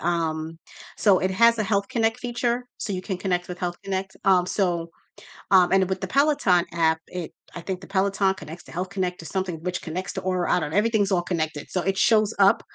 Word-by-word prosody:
um, 160 -1 -2 0.4
so 200 -4 +4
it 185 - 0
has 230 +4 +4
a 215 - +2
Health 200 -1 0
Connect 225 -1 0
feature, 245 0 -1
so 205 - -4
you 185 - -2
can 185 0 -4
connect 180 -1 -1
with 180 - -6
Health 175 -1 -3
Connect, 195 0 -3
um, 185 -2 +4
so, 175 -4 0 0.6
um, 185 -2 +5
and 190 -1 +3
with 190 -1 -1
the - - -4
Peloton 275 - +3
app, 160 -1 +2
it, 180 -3 -6 0.2
I 175 - -6
think 185 +1 -4
the - - -11
Peloton 195 0 +1
connects 160 +1 -10
to - - -13
Health 180 +2 -3
Connect 185 -2 -2
to 165 - -10
something 185 -1 -2
which 180 0 -3
connects 180 +3 -5
to - - -4
Aura, 185 -1 0
I - - +3
don't 150 - -3
kn 170 - -1
everything's 210 -2 +2
all 175 -2 +2
connected, 155 -4 -2
so 180 - 0
it 195 +1 -1
shows 215 0 +3
up 195 0 +5
185 Hz, 225 wpm, -24 LUFS, 175-200 Hz, 0.6 s, um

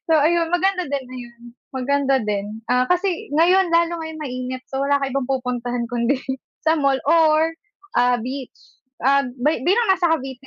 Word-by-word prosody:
So 320 - +5
ayun 330 +2 +2
maganda 370 +1 +1
din 280 -2 -2
ayun 240 -2 -11 0.3
maganda 275 +1 +1
din, 210 +1 -4
ah, 250 0 +2
kasi 360 -4 0
ngayon 350 +4 +3
lalo 335 0 +1
ngayong 320 0 -7
mainit, 255 -1 -5
so 270 0 -3
wala 280 0 +2
kang 275 -1 -2
ibang 270 -1 -2
pupuntahan 245 -2 -2
kundi 245 +3 0 0.5
sa 320 - +5
mall 275 -3 +2
or, 320 0 +4 0.4
ah, 245 0 +3
beach, 255 +2 -6 0.5
ah, 280 +1 +4
bi 255 +2 -1
bilang 445 - +2
nasa 360 -3 +2
Cavite 270 -4 -3
275 Hz, 165 wpm, -21 LUFS, 250-325 Hz, 0.5 s, So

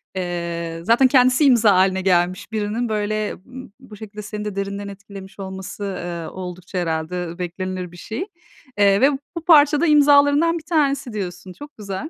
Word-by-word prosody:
eee, 170 -2 -4
zaten 240 +6 +4
kendisi 255 +2 +4
imza 230 -6 +5
haline 190 0 +2
gelmiş 185 +1 0
birinin, 220 +2 -2
böyle 215 0 -2
b 260 +1 -11
bu 210 - -13
şekilde 210 0 -9
seni 210 0 -6
de 205 -2 -5
derinden 200 0 -4
etkilemiş 200 0 -11
olması, 190 +1 -7 0.2
eee, 170 -2 -5
oldukça 180 0 -8
herhalde 170 +1 -3
beklenilir 180 0 -5
bir 175 - -14
şey. 225 - -5 0.5
Eee, 200 0 +4
ve 275 +2 +5 0.3
bu 330 - -6
parça 300 -2 +5
da - - +3
imzalarından 290 +2 +4
bir 320 - -9
tanesi 280 -6 0
diyorsun. 185 -2 -6
Çok 290 +10 -13
güzel. 210 +8 -6
205 Hz, 165 wpm, -21 LUFS, 185-255 Hz, 0.5 s, imza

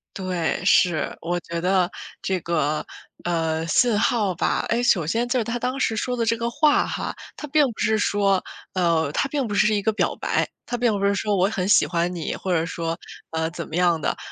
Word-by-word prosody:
对， 185 -4 -1
是， 175 -5 +3
我 175 +1 -1
觉 170 -1 -5
得 180 0 +2 0.3
这 190 -1 0
个， 155 -3 0 0.4
呃， 165 -2 -1
信 220 +7 +3
号 215 -4 +1
吧， - - 0
哎， 235 +1 0
首 175 -10 +3
先 230 +8 0
就 255 0 +2
是 - - +1
他 240 +1 -2
当 255 +3 -2
时 225 - +1
说 250 +3 -2
的 230 - 0
这 230 - +2
个 235 +1 -2
话 295 +4 +3
哈， - - -4 0.2
他 300 - -6
并 300 +1 +4
不 220 - -14
是 220 -1 +2
说 200 -2 +2 0.3
呃， 170 -4 +2
他 275 - 0
并 275 -3 -1
不 205 - -3
是 210 +2 +4
一 205 - +1
个 220 +2 +1
表 - - 0
白， - - 0 0.2
他 245 - -3
并 240 -1 +2
不 200 - 0
是 200 0 +2
说 205 0 0
“我 185 - +4
很 190 -3 -2
喜 - - +5
欢 175 +1 0
你”， 165 -3 -3
或 190 - -4
者 165 -2 +2
说， 165 -1 -3 0.3
呃， 160 0 -1
怎 170 -1 -6
么 155 - -5
样 175 -3 +3
的， - - -1
190 Hz, 240 characters per minute, -23 LUFS, 170-230 Hz, 0.4 s, 喜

